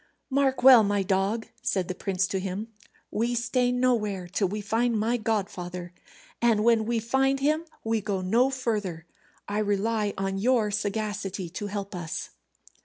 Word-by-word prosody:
"Mark 265 Hz, -2 st, +1 dB
well, 255 Hz, -3 st, +10 dB
my 205 Hz, -1 st, +1 dB
dog," 195 Hz, +4 st, 0 dB, 0.2 s
said 185 Hz, -3 st, 0 dB
the 185 Hz, -, -2 dB
prince 190 Hz, 0 st, -1 dB
to 190 Hz, 0 st, -2 dB
him, 195 Hz, +4 st, -4 dB, 0.4 s
"we 235 Hz, +3 st, 0 dB
stay 245 Hz, +1 st, +1 dB
nowhere 220 Hz, -7 st, 0 dB
till 195 Hz, +2 st, 0 dB
we 210 Hz, +4 st, -4 dB
find 225 Hz, +3 st, 0 dB
my 225 Hz, +3 st, +1 dB
godfather, 185 Hz, -6 st, -3 dB, 0.5 s
and 230 Hz, -3 st, +3 dB
when 225 Hz, -1 st, +3 dB
we 235 Hz, 0 st, +1 dB
find 265 Hz, +4 st, +1 dB
him 305 Hz, +4 st, +1 dB, 0.2 s
we 225 Hz, -1 st, 0 dB
go 200 Hz, -2 st, -2 dB
no 230 Hz, +8 st, +3 dB
further. 210 Hz, -10 st, -2 dB, 0.4 s
I 205 Hz, +1 st, -1 dB
rely 210 Hz, 0 st, 0 dB
on 195 Hz, 0 st, -2 dB
your 225 Hz, -1 st, +2 dB
sagacity 205 Hz, -3 st, -2 dB
to 205 Hz, +4 st, -5 dB
help 200 Hz, 0 st, -5 dB
us." 175 Hz, -3 st, -5 dB
210 Hz, 160 wpm, -27 LUFS, 195-235 Hz, 0.5 s, well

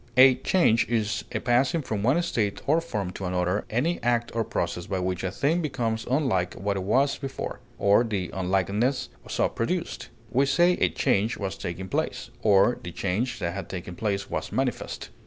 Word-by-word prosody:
A 130 Hz, 0 st, +9 dB
change 125 Hz, -3 st, +2 dB
is 105 Hz, -2 st, 0 dB
a 110 Hz, -, -1 dB
passing 130 Hz, +7 st, +2 dB
from 110 Hz, -5 st, -2 dB
one 130 Hz, +10 st, +3 dB
state 105 Hz, -10 st, -1 dB
or 160 Hz, +4 st, +3 dB
form 105 Hz, -, -3 dB
to 95 Hz, -, -6 dB
another, 90 Hz, +2 st, 0 dB
any 150 Hz, +10 st, 0 dB
act 120 Hz, 0 st, +1 dB
or 115 Hz, -, +2 dB
process 90 Hz, -6 st, -3 dB
by 95 Hz, -, -1 dB
which 90 Hz, 0 st, -2 dB
a 95 Hz, -, 0 dB
thing 150 Hz, -, +1 dB
becomes 120 Hz, -7 st, -2 dB
unlike 125 Hz, -, +1 dB
what 100 Hz, +1 st, -2 dB
it 95 Hz, -, -2 dB
was 135 Hz, +9 st, +2 dB
before, 135 Hz, -1 st, -5 dB, 0.2 s
or 100 Hz, +3 st, +4 dB
the 100 Hz, -6 st, -2 dB
unlikeness 95 Hz, +7 st, 0 dB, 0.2 s
so -, -, +2 dB
produced; 170 Hz, +9 st, -3 dB, 0.2 s
we 135 Hz, +3 st, +3 dB
say 170 Hz, +7 st, +4 dB
a -, -, +3 dB
change 115 Hz, -4 st, +1 dB
was 95 Hz, -1 st, -3 dB
taking 90 Hz, +2 st, -5 dB
place, -, -, -2 dB
or 105 Hz, +3 st, +4 dB
the 85 Hz, -, -6 dB
change 100 Hz, +8 st, -1 dB
that 85 Hz, 0 st, -2 dB
had 100 Hz, -2 st, -6 dB
taken 90 Hz, -1 st, -6 dB
place 100 Hz, -1 st, -1 dB
was -, -, -4 dB
manifest. -, -, -2 dB
110 Hz, 185 wpm, -26 LUFS, 95-130 Hz, 0.2 s, A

